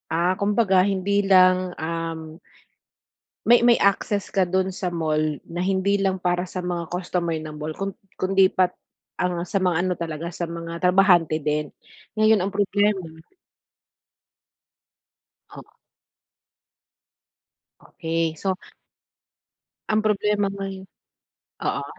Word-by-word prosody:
Ah, 170 +3 +1
kumbaga, 200 -2 +3
hindi 200 +1 +1
lang, 185 -1 +4
um, 160 -1 -4 1.1
may 240 +2 +6
may 240 - +7
access 200 0 +1
ka 190 -2 +2
dun 190 +1 0
sa 185 0 -4
mall 160 -3 -1 0.2
na 170 +1 -7
hindi 195 +2 +1
lang 190 -2 -1
para 180 0 0
sa 180 0 -5
mga 175 -2 -3
customer 175 -1 -2
ng 155 -1 -6
mall 155 +1 -5
kun 195 0 -3 0.2
kundi 190 0 +3
pat 185 -1 +1 0.5
ang 180 -1 -1
sa 195 +3 -1
mga 180 -2 +1
ano 185 -1 0
talaga, 165 0 -4
sa 175 0 -4
mga 170 0 -6
trabahante 180 -3 +4
din. 150 0 0 0.5
Ngayon, 215 0 +4
ang 190 +2 -2
problema 205 +1 +2 2.5
Oh. - - -10 2.2
Okey, 165 -1 -2
so 190 +3 -2 1.3
Ang 215 0 +2
problema 210 -1 +1
ngayon 195 -1 -6 0.8
oo. - - -1
185 Hz, 115 wpm, -23 LUFS, 170-195 Hz, 2.5 s, may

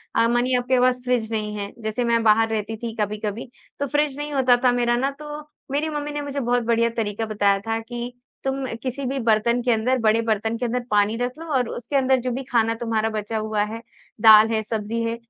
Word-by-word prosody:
अ, 230 - +4
मानिए 245 +2 +2
आपके 250 +1 +1
पास 250 0 +2
फ़्रिज 235 -3 0
नहीं 210 -1 -2
है 200 0 -5
जैसे 220 +3 -1
मैं 235 -1 +2
बाहर 225 +1 +4
रहती 220 0 -2
थी 230 0 -5
कभी-कभी 210 +3 -3 0.3
तो 285 - -1
फ़्रिज 290 0 0
नहीं 295 0 -4
होता 255 -3 +4
था 250 - +5
मेरा 240 -1 +1
ना 270 +3 0
तो 300 0 -7 0.3
मेरी 300 +3 0
मम्मी 295 -1 -4
ने 295 0 -3
मुझे 285 0 -4
बहुत 245 -1 +1
बढ़िया 230 0 +2
तरीका 220 0 -1
बताया 205 -2 +2
था 225 0 0
कि 240 +1 -6 0.3
तुम 270 0 -2 0.2
किसी 260 +1 -3
भी 270 +2 -2
बर्तन 235 +1 +2
के 245 - +2
अंदर 240 +4 +2
बड़े 225 +1 +3
बर्तन 225 0 -1
के 245 - -2
अंदर 245 +1 -1
पानी 205 +1 +3
रख 245 +3 -3
लो 330 - -7
और 250 -3 +1
उसके 240 +4 -5
अंदर 265 -1 +3
जो 250 0 -2
भी 265 +3 -3
खाना 230 -1 +3
तुम्हारा 225 -1 0
बचा 220 +1 -3
हुआ 215 -1 0
है, 225 +2 -6 0.4
दाल 220 0 +8
है, 220 -1 +1
सब्ज़ी 220 +1 -3
है, 230 0 -1
235 Hz, 225 wpm, -23 LUFS, 220-255 Hz, 0.4 s, दाल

